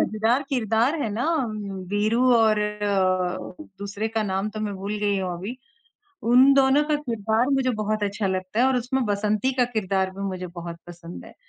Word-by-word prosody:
मज़ेदार 225 Hz, +5 st, +1 dB
किरदार 245 Hz, +4 st, +1 dB
हैं 220 Hz, -, -2 dB
ना 225 Hz, +6 st, -2 dB, 0.2 s
उम, 215 Hz, -2 st, -5 dB, 0.4 s
वीरू 225 Hz, +5 st, +2 dB
और 220 Hz, -2 st, +3 dB
अ, 195 Hz, -3 st, -1 dB, 0.2 s
दूसरे 200 Hz, +2 st, -3 dB
का 225 Hz, 0 st, -1 dB
नाम 195 Hz, 0 st, -1 dB
तो 215 Hz, 0 st, -6 dB
मैं 205 Hz, -2 st, -3 dB
भूल 200 Hz, +2 st, -4 dB
गई 205 Hz, -1 st, +1 dB
हूँ 185 Hz, -2 st, -2 dB
अभी, 200 Hz, +9 st, -6 dB, 0.7 s
उन 255 Hz, +4 st, +6 dB
दोनों 275 Hz, +2 st, +4 dB
का 300 Hz, -, +3 dB
किरदार 230 Hz, -2 st, 0 dB
मुझे 270 Hz, -2 st, +2 dB
बहुत 215 Hz, 0 st, -1 dB
अच्छा 200 Hz, 0 st, -1 dB
लगता 185 Hz, +3 st, -2 dB
है 255 Hz, -, +5 dB
और 265 Hz, -, +2 dB
उसमें 250 Hz, +2 st, -1 dB
बसंती 210 Hz, +4 st, 0 dB
का 250 Hz, -, +5 dB
किरदार 195 Hz, -5 st, -1 dB
भी 195 Hz, +1 st, -9 dB
मुझे 185 Hz, -1 st, -5 dB
बहुत 170 Hz, -1 st, -8 dB
पसंद 175 Hz, 0 st, -10 dB
है। -, -, -13 dB
215 Hz, 190 wpm, -24 LUFS, 195-240 Hz, 0.7 s, उन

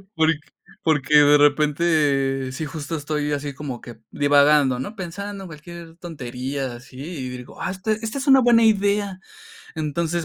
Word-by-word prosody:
Porq 160 Hz, -1 st, +2 dB, 0.4 s
porque 150 Hz, -2 st, +2 dB
de 145 Hz, 0 st, +7 dB
repente 145 Hz, -3 st, +2 dB
sí 145 Hz, +4 st, -4 dB
justo 155 Hz, +1 st, -5 dB
estoy 150 Hz, 0 st, -2 dB
así 145 Hz, 0 st, -3 dB
como 135 Hz, -3 st, -6 dB
que 120 Hz, -2 st, -12 dB
divagando, 145 Hz, -2 st, +4 dB
¿no?, 200 Hz, -, -6 dB
pensando 195 Hz, +2 st, -6 dB
cualquier 165 Hz, +1 st, -11 dB
tontería 135 Hz, -5 st, -5 dB
así, 125 Hz, +1 st, -14 dB
y 145 Hz, -4 st, -5 dB
digo: 125 Hz, -1 st, -10 dB
"Ah, -, -, -2 dB
esta-esta 215 Hz, +5 st, -3 dB
es 275 Hz, +1 st, -4 dB
una 270 Hz, -1 st, +7 dB
buena 235 Hz, -2 st, +5 dB
idea". 200 Hz, -2 st, +2 dB, 0.6 s
Entonces, 160 Hz, +2 st, -2 dB
150 Hz, 145 wpm, -22 LUFS, 140-175 Hz, 0.6 s, de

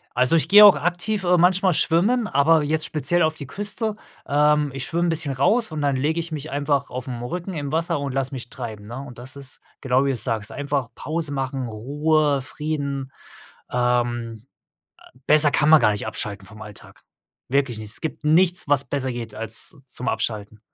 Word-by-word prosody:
Also, 125 Hz, +5 st, +3 dB
ich 160 Hz, -, +2 dB
gehe 210 Hz, +1 st, +10 dB
auch 205 Hz, -, +8 dB
aktiv, 180 Hz, +4 st, -1 dB
äh, 180 Hz, 0 st, +3 dB
manchmal 180 Hz, +1 st, +3 dB
schwimmen, 210 Hz, +11 st, +2 dB
aber 150 Hz, +1 st, +3 dB
jetzt 155 Hz, +1 st, -1 dB
speziell 155 Hz, +3 st, 0 dB
auf 155 Hz, 0 st, +1 dB
die 145 Hz, -, -8 dB
Küste, 210 Hz, -, -2 dB, 0.3 s
ähm 150 Hz, 0 st, +2 dB
ich 135 Hz, -1 st, -4 dB
schwimme 170 Hz, +1 st, -1 dB
'n -, -, +1 dB
bisschen 155 Hz, -4 st, -1 dB
raus 215 Hz, -, +1 dB
und 155 Hz, -1 st, -4 dB
dann 140 Hz, -1 st, +1 dB
lege 150 Hz, +5 st, 0 dB
ich 170 Hz, 0 st, -5 dB
mich 155 Hz, 0 st, -5 dB
einfach 140 Hz, -1 st, -1 dB
aufm 125 Hz, -1 st, -6 dB
Rücken 175 Hz, +8 st, -5 dB
im 145 Hz, -4 st, -4 dB
Wasser 160 Hz, -2 st, 0 dB
und 140 Hz, -2 st, -4 dB
lasse 135 Hz, 0 st, -2 dB
mich 120 Hz, -2 st, -7 dB
treiben, 110 Hz, -5 st, -8 dB
ne, 120 Hz, +3 st, -7 dB
und 130 Hz, -4 st, -11 dB
das 130 Hz, +2 st, -7 dB
ist 140 Hz, -2 st, -8 dB, 0.2 s
genau 130 Hz, +1 st, +2 dB
wie -, -, +1 dB
du's 130 Hz, -4 st, -2 dB
sagst, 110 Hz, -4 st, -3 dB
einfach 140 Hz, -3 st, -2 dB
Pause 155 Hz, 0 st, -4 dB
machen, 135 Hz, -2 st, -3 dB
Ruhe, 145 Hz, +5 st, 0 dB
Frieden. 140 Hz, -1 st, -4 dB, 0.6 s
Ähm, 120 Hz, -2 st, -1 dB, 0.6 s
äh, 125 Hz, -, -20 dB
besser 150 Hz, -1 st, +7 dB
kann 150 Hz, +1 st, +2 dB
man 160 Hz, -1 st, +7 dB
gar -, -, +4 dB
nicht 105 Hz, -, -4 dB
abschalten 100 Hz, -2 st, -5 dB
vom 110 Hz, +2 st, -12 dB
Alltag. 105 Hz, -1 st, -12 dB, 0.5 s
Wirklich 135 Hz, -3 st, 0 dB
nicht. 110 Hz, -1 st, -6 dB
Es -, -, 0 dB
gibt 160 Hz, -1 st, -5 dB
nichts, 175 Hz, +1 st, +4 dB
was 140 Hz, -1 st, +2 dB
besser 135 Hz, -2 st, -3 dB
geht 120 Hz, -2 st, -7 dB
als 115 Hz, +5 st, -3 dB
zum 125 Hz, +1 st, -7 dB
Abschalten. 105 Hz, -3 st, -3 dB
140 Hz, 195 wpm, -22 LUFS, 125-160 Hz, 0.6 s, gehe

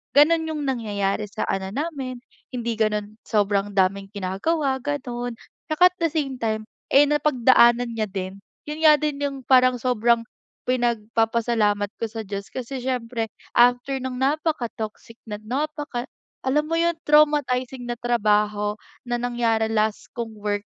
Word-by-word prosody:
gano'n 320 Hz, +3 st, +5 dB
'yong 305 Hz, -2 st, -3 dB
nangyayari 210 Hz, -5 st, -1 dB
sa -, -, -4 dB
ano 190 Hz, 0 st, -2 dB
namin, 270 Hz, -5 st, -4 dB, 0.2 s
hindi 235 Hz, -3 st, -4 dB
gano'n, 210 Hz, 0 st, -1 dB
sobrang 205 Hz, -1 st, +1 dB
daming 195 Hz, +1 st, +2 dB
ginagawa, 265 Hz, -, -1 dB
gano'n, 245 Hz, -3 st, -4 dB, 0.3 s
'tsaka 360 Hz, +4 st, +5 dB
at -, -, -36 dB
the 335 Hz, -, +2 dB
same 290 Hz, -5 st, -2 dB
time, 220 Hz, -2 st, -1 dB, 0.3 s
eh, 285 Hz, -, +9 dB
napagdaanan 250 Hz, -5 st, +4 dB
niya 220 Hz, -2 st, -2 dB
din. 190 Hz, 0 st, -5 dB, 0.2 s
'Yon 300 Hz, +1 st, -6 dB
nga 305 Hz, -, +9 dB
din 295 Hz, -1 st, -2 dB
'yong 285 Hz, -1 st, -2 dB
parang 255 Hz, 0 st, +5 dB
sobrang, 235 Hz, -1 st, +2 dB, 0.4 s
pinagpapasalamat 225 Hz, -3 st, +1 dB
ko -, -, -2 dB
sa 225 Hz, 0 st, -5 dB
Diyos 200 Hz, -1 st, -5 dB
kasi 260 Hz, +1 st, -5 dB
siyempre 235 Hz, -3 st, -2 dB, 0.3 s
after 245 Hz, +3 st, +4 dB
ng 260 Hz, -1 st, -4 dB
napakatoxic 250 Hz, -6 st, -2 dB
na 210 Hz, -, -4 dB
napaka 285 Hz, +1 st, -3 dB, 0.4 s
alam 300 Hz, +4 st, +1 dB
mo 330 Hz, -, +1 dB
'yon, 340 Hz, 0 st, +3 dB
traumatizing 280 Hz, -4 st, +3 dB
na 240 Hz, -, -2 dB
trabaho 210 Hz, -3 st, +1 dB, 0.3 s
na 240 Hz, -1 st, -2 dB
nangyari 235 Hz, -2 st, 0 dB
last 215 Hz, -1 st, 0 dB
kong 225 Hz, -2 st, -5 dB
work, 205 Hz, 0 st, -2 dB
240 Hz, 140 wpm, -24 LUFS, 215-275 Hz, 0.4 s, eh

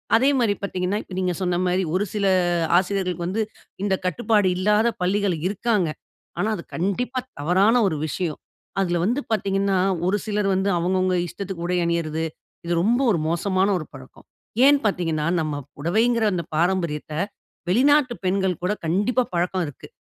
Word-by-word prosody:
அதே 265 Hz, +5 st, +4 dB
மாரி 220 Hz, -4 st, +3 dB
பாத்தீங்கன்னா, 185 Hz, +1 st, -1 dB
இப்ப 185 Hz, -, -9 dB
நீங்க 180 Hz, -1 st, 0 dB
சொன்ன 180 Hz, -1 st, 0 dB
மாரி 180 Hz, +1 st, +1 dB
ஒரு 205 Hz, +3 st, +1 dB
சில 205 Hz, -2 st, 0 dB, 0.5 s
ஆசிரியர்களுக்கு 180 Hz, -2 st, -1 dB
வந்து 220 Hz, +4 st, 0 dB, 0.4 s
இந்த 195 Hz, -2 st, +2 dB
கட்டுப்பாடு 210 Hz, 0 st, +2 dB
இல்லாத 210 Hz, +4 st, +3 dB, 0.2 s
பள்ளிகள் 195 Hz, -2 st, +1 dB
இருக்காங்க. 205 Hz, -4 st, 0 dB, 0.5 s
ஆனா, 210 Hz, +3 st, +1 dB
அது 170 Hz, -, -8 dB
கண்டிப்பா 235 Hz, +8 st, -1 dB, 0.2 s
தவறான 190 Hz, +9 st, +3 dB
ஒரு 160 Hz, -, -1 dB
விஷயம். 160 Hz, 0 st, -3 dB, 0.4 s
அதுல 175 Hz, -2 st, +1 dB
வந்து 245 Hz, +6 st, +1 dB
பாத்தீங்கன்னா, 195 Hz, -2 st, +1 dB, 0.3 s
ஒரு 205 Hz, +2 st, +2 dB
சிலர் 210 Hz, -2 st, 0 dB
வந்து 190 Hz, +1 st, +1 dB
அவுங்க 180 Hz, +2 st, +1 dB
அவுங்க 185 Hz, 0 st, +1 dB
இஷ்டத்துக்கு 175 Hz, -1 st, -6 dB
உடை 180 Hz, 0 st, 0 dB
அணியறது, 165 Hz, -1 st, -1 dB, 0.4 s
இது 175 Hz, -, 0 dB
ரொம்ப 240 Hz, +4 st, +3 dB
ஒரு 170 Hz, -, +1 dB
மோசமான 185 Hz, +3 st, +1 dB
ஒரு 155 Hz, -, -6 dB
பழக்கம். 130 Hz, -1 st, -13 dB, 0.4 s
ஏன் 285 Hz, 0 st, +6 dB
பாத்தீங்கன்னா, 165 Hz, -6 st, 0 dB, 0.2 s
நம்ம 155 Hz, -2 st, -2 dB, 0.2 s
புடவைங்கிற 220 Hz, +9 st, +2 dB
அந்த 170 Hz, -2 st, -1 dB
பாரம்பரியத்த 170 Hz, -3 st, 0 dB, 0.6 s
வெளிநாட்டு 265 Hz, +4 st, +4 dB
பெண்கள் 190 Hz, -2 st, +1 dB
கூட 195 Hz, +3 st, +1 dB
கண்டிப்பா 205 Hz, +9 st, +2 dB
பழக்கம் 180 Hz, +1 st, 0 dB
இருக்கு. 145 Hz, -, -10 dB
190 Hz, 155 wpm, -23 LUFS, 175-210 Hz, 0.6 s, ஏன்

